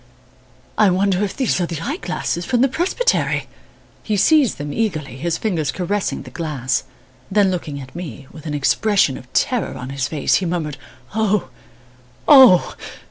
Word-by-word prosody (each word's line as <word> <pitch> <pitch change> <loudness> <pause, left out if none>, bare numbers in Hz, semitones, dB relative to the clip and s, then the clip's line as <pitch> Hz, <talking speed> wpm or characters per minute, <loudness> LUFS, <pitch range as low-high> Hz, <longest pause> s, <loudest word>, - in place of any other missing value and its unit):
I 210 -2 +6
wonder 190 +1 +1
if 200 - -4
these 255 -8 +1
are 175 - 0
the 165 -3 -5
eye 275 - -3
glasses 175 - -3
from 245 +5 0
the 265 - +5
presbytery!" 370 - 0 0.5
He 210 -2 -1
seized 290 - +4
them 145 0 -5
eagerly, 155 - -2
his 165 +5 -2
fingers 165 -10 -1
caressing 190 +2 -2
the - - -12
glass. 150 -6 -2 0.4
Then 195 -1 +3
looking 155 -5 -4
at 130 +1 -11
me, 165 -5 -7
with 155 0 -11
an 150 - -2
expression 150 +1 +2
of 125 0 -12
terror 245 - 0
on 125 +1 -7
his 135 -2 -2
face, 150 -2 -1
he 185 - -1
murmured, 160 -5 -3 0.4
"Oh! 210 -2 +1 0.8
Oh!" 260 -11 +7
180 Hz, 165 wpm, -20 LUFS, 150-215 Hz, 0.8 s, Oh